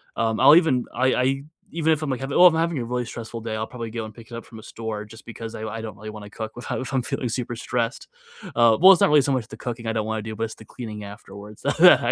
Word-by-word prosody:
um, 110 Hz, -1 st, 0 dB
I'll 155 Hz, -, +8 dB
even, 150 Hz, -8 st, +3 dB
I 130 Hz, 0 st, +2 dB
I 125 Hz, -, +1 dB
e 135 Hz, +1 st, 0 dB, 0.3 s
even 160 Hz, -1 st, +2 dB
if 155 Hz, -, -2 dB
I'm, 155 Hz, -, -2 dB
like, 130 Hz, -, -2 dB
having 135 Hz, +1 st, -2 dB
well, 180 Hz, -, +10 dB
if 170 Hz, -, +4 dB
I'm 160 Hz, -, 0 dB
having 165 Hz, -4 st, 0 dB
a 120 Hz, -, -3 dB
really 125 Hz, 0 st, -2 dB
stressful 115 Hz, 0 st, -7 dB
day, 110 Hz, -1 st, -4 dB
I'll 110 Hz, 0 st, -3 dB
probably 115 Hz, -3 st, -7 dB
go 115 Hz, -1 st, -4 dB
and 110 Hz, -, -10 dB
pick 115 Hz, +1 st, -15 dB
it -, -, -6 dB
up 115 Hz, -, -7 dB
from 110 Hz, -, -12 dB
a 110 Hz, -, -13 dB
store 110 Hz, -2 st, -6 dB
just 110 Hz, +2 st, -14 dB
because 115 Hz, -1 st, -8 dB
I 110 Hz, -, -6 dB
I 110 Hz, +1 st, -5 dB
don't 110 Hz, -3 st, -7 dB
really 110 Hz, +1 st, -8 dB
wanna 105 Hz, -1 st, -10 dB
cook 110 Hz, +2 st, -7 dB
with 120 Hz, -, -9 dB
how -, -, -3 dB
if 130 Hz, +1 st, -6 dB
I'm 130 Hz, -, +2 dB
feeling 130 Hz, -1 st, -2 dB
super 120 Hz, 0 st, -3 dB
stressed, 115 Hz, 0 st, -3 dB, 0.5 s
uh, 115 Hz, -2 st, +5 dB
well, 190 Hz, +2 st, +10 dB
it's 185 Hz, -, +5 dB
not -, -, +5 dB
really 150 Hz, -1 st, +6 dB
so 140 Hz, -, 0 dB
much 125 Hz, -5 st, -1 dB
the -, -, -10 dB
cooking 120 Hz, -2 st, -6 dB
I 115 Hz, -, 0 dB
don't 110 Hz, -1 st, -1 dB
wanna 110 Hz, 0 st, -2 dB
do, 110 Hz, 0 st, -6 dB
but 115 Hz, -, -3 dB
it's 110 Hz, -, -8 dB
the 110 Hz, -, -14 dB
cleaning 105 Hz, -3 st, -8 dB
afterwards 100 Hz, 0 st, -11 dB
that -, -, -1 dB, 0.2 s
I -, -, +1 dB
115 Hz, 315 wpm, -24 LUFS, 110-130 Hz, 0.5 s, well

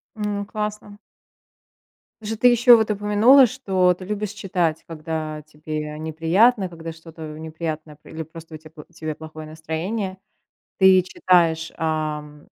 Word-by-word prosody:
Ну, 205 Hz, -1 st, -3 dB
классно. 210 Hz, -1 st, -5 dB, 1.2 s
Же 220 Hz, +1 st, -4 dB
ты 245 Hz, +3 st, +5 dB
еще 240 Hz, 0 st, +7 dB
вот 220 Hz, -1 st, 0 dB
упомянула, 210 Hz, +6 st, +5 dB
что 190 Hz, -7 st, +1 dB
ты 185 Hz, -, -11 dB
любишь 210 Hz, 0 st, -3 dB
читать, 180 Hz, -6 st, -1 dB
когда 155 Hz, -1 st, -5 dB
тебе 150 Hz, 0 st, -6 dB
неприятно, 180 Hz, +7 st, +2 dB
когда 165 Hz, -1 st, -8 dB
что-то 160 Hz, -1 st, -10 dB
неприятное 160 Hz, -1 st, -6 dB
про 150 Hz, -, -17 dB
или 160 Hz, 0 st, -6 dB
просто 160 Hz, +1 st, -12 dB
у -, -, -11 dB
тя 155 Hz, 0 st, -15 dB
у 155 Hz, +2 st, -13 dB
тебя 155 Hz, -2 st, -5 dB
плохое 155 Hz, 0 st, -10 dB
настроение. 175 Hz, +6 st, -4 dB, 0.6 s
Ты 190 Hz, -1 st, +7 dB
читаешь, 170 Hz, -3 st, +1 dB
ам 150 Hz, -2 st, -3 dB
165 Hz, 140 wpm, -22 LUFS, 155-205 Hz, 1.2 s, еще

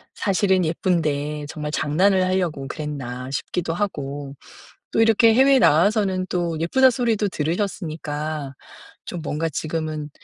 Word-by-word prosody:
사실은 190 Hz, -2 st, +1 dB
예쁜데 150 Hz, -3 st, -1 dB
정말 150 Hz, -1 st, -5 dB
장난을 185 Hz, +6 st, +2 dB
하려고 175 Hz, -7 st, -1 dB
그랬나 135 Hz, -5 st, -5 dB
싶기도 165 Hz, +3 st, -2 dB
하고 145 Hz, -7 st, -4 dB, 0.6 s
또 225 Hz, -, +2 dB
이렇게 225 Hz, 0 st, +5 dB
해외에 270 Hz, +1 st, +5 dB
나와서는 190 Hz, +1 st, +3 dB
또 170 Hz, -3 st, -1 dB
예쁘다 260 Hz, +11 st, +4 dB
소리도 230 Hz, -4 st, 0 dB
들으셨으니까 155 Hz, -4 st, -3 dB, 0.5 s
좀 175 Hz, -3 st, -6 dB
뭔가 160 Hz, +2 st, -2 dB
지금은 155 Hz, -1 st, -4 dB
165 Hz, 305 characters per minute, -22 LUFS, 150-195 Hz, 0.6 s, 이렇게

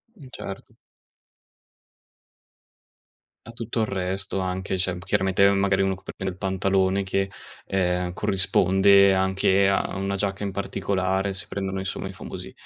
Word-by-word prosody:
Mh, 145 Hz, -10 st, -13 dB
certo. 95 Hz, -5 st, -8 dB, 2.7 s
A -, -, -8 dB
tutto 115 Hz, 0 st, -3 dB
il 110 Hz, -, +2 dB
resto 95 Hz, 0 st, -2 dB
anche, 95 Hz, +1 st, -2 dB
cioè 95 Hz, 0 st, -1 dB
m -, -, -7 dB
chiaramente 95 Hz, +1 st, +2 dB
magari 95 Hz, -1 st, +2 dB
uno 95 Hz, -, +1 dB
c 95 Hz, -, -10 dB
per -, -, -9 dB
prendere 95 Hz, 0 st, -3 dB
il 90 Hz, -, -12 dB
pantalone 95 Hz, 0 st, +1 dB
che, 95 Hz, +1 st, -1 dB, 0.4 s
ehm, 90 Hz, -2 st, 0 dB
corrisponde 95 Hz, +1 st, +4 dB
anche 95 Hz, +1 st, +3 dB
a 95 Hz, -, 0 dB
una 100 Hz, 0 st, -2 dB
giacca 100 Hz, 0 st, -2 dB
in 100 Hz, -, -2 dB
particolare 95 Hz, 0 st, -1 dB
si 95 Hz, -, -6 dB
prendono 95 Hz, -1 st, -3 dB
insomma 95 Hz, 0 st, -4 dB
i 95 Hz, -, -8 dB
famosi, -, -, -8 dB
95 Hz, 145 wpm, -25 LUFS, 95-100 Hz, 2.7 s, corrisponde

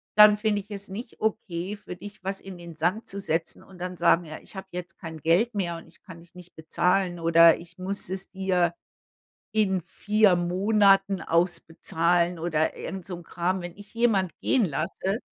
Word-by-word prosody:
dann 210 Hz, 0 st, +8 dB
finde 210 Hz, -1 st, 0 dB
ich 195 Hz, -, -21 dB
es 200 Hz, -1 st, -6 dB
nicht 225 Hz, +5 st, -8 dB
okay, 205 Hz, -3 st, -2 dB
für 195 Hz, -3 st, -9 dB
dich 205 Hz, +2 st, -11 dB
was 195 Hz, +1 st, -3 dB
in 190 Hz, -2 st, -9 dB
den 170 Hz, -1 st, -10 dB
Sand 175 Hz, +8 st, -1 dB
zu 200 Hz, -, -2 dB
setzen 165 Hz, -3 st, -2 dB
und 190 Hz, -, -16 dB
dann 180 Hz, 0 st, -5 dB
sagen 175 Hz, +1 st, +4 dB
ja, 155 Hz, 0 st, -8 dB
ich -, -, -11 dB
habe 190 Hz, 0 st, -7 dB
jetzt 180 Hz, 0 st, -7 dB
kein 160 Hz, -3 st, -8 dB
Geld 175 Hz, +10 st, +2 dB
mehr 175 Hz, -4 st, -1 dB
und 165 Hz, -, -13 dB
ich -, -, -19 dB
kann 175 Hz, -3 st, -12 dB
dich 170 Hz, 0 st, -19 dB
nicht 180 Hz, -1 st, -14 dB
bezahlen 180 Hz, +2 st, 0 dB
oder 165 Hz, 0 st, +6 dB
ich 170 Hz, 0 st, -14 dB
muss 190 Hz, 0 st, -2 dB
es 190 Hz, +1 st, -5 dB
dir 185 Hz, -3 st, +1 dB, 0.8 s
in 190 Hz, -4 st, +2 dB
4 210 Hz, +2 st, +2 dB
Monaten 195 Hz, +2 st, +3 dB
ausbezahlen 170 Hz, 0 st, +1 dB
oder 160 Hz, -2 st, 0 dB
irgend 190 Hz, -2 st, -6 dB
so 185 Hz, -, -5 dB
'n 175 Hz, -, -11 dB
Kram. 180 Hz, +3 st, -2 dB
Wenn 175 Hz, +1 st, -8 dB
ich 205 Hz, +1 st, -14 dB
jemand 220 Hz, -6 st, +2 dB
gehen 245 Hz, -5 st, +3 dB
lasse, 185 Hz, +6 st, -2 dB
185 Hz, 190 wpm, -26 LUFS, 170-200 Hz, 0.8 s, dann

